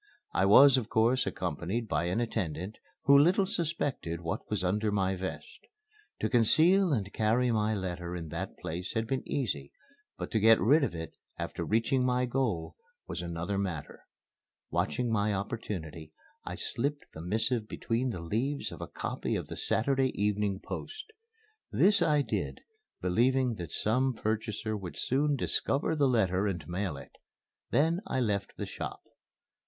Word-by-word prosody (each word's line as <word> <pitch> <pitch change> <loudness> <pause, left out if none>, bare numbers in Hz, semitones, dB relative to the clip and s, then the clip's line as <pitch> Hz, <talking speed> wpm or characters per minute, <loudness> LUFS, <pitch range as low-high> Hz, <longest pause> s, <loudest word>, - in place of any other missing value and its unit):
I 95 - +3
was 135 +6 +8
of 115 -3 -2
course 120 +4 +3
accompanied 90 +7 -2
by 75 -2 0
an 90 +5 0
attendant, 100 -4 -3 0.2
who 140 - +6
little 175 +7 +5
suspected 150 - -2
what 85 -1 -4
was 105 -4 -1
under 105 +4 +1
my 95 -2 +1
vest. 95 - -6 0.6
To - - +2
conceal 165 - +4
and 105 -7 -1
carry 115 +3 +2
my 110 -1 +1
letter 90 -2 -4
in 85 -3 -6
that 85 +5 -5
place 85 +3 -5
had 110 0 +1
been 130 +2 -1
easy; 95 - -2 0.5
but - - -5
to 110 - +2
get 110 +1 +6
rid 145 +7 +4
of 135 - -1
it 80 0 -6 0.2
after - - -4
reaching 115 +4 +1
my 125 0 +2
goal 120 -10 -1 0.3
was - - -4
another 85 +3 -3
matter. 90 -7 -5 0.6
Watching 125 -2 0
my 105 -1 +1
opportunity, 90 -7 -5 0.3
I - - -5
slipped 145 +4 -2
the 80 - -8
missive 110 +5 +1
between 120 +4 -1
the 90 -8 -4
leaves 120 - -2
of - - -9
a - - -4
copy - - -3
of - - -4
the - - -5
Saturday 135 +3 +1
Evening 105 -1 0
Post. 435 +1 -7 0.6
This 205 +1 +4
I 150 -2 +3
did, - - -3 0.4
believing 125 +7 +2
that 85 -4 -6
some 125 +4 +1
purchaser 110 0 -2
would 95 -4 -7
soon 145 +3 +1
discover 140 +3 +1
the 145 -2 +3
letter 100 -5 +2
and 85 -7 -3
mail 90 -3 -2
it. 70 - -11 0.6
Then 160 +7 +2
I - - -1
left 105 -5 -1
the - - -3
shop. - - -6
110 Hz, 160 wpm, -30 LUFS, 95-130 Hz, 0.6 s, was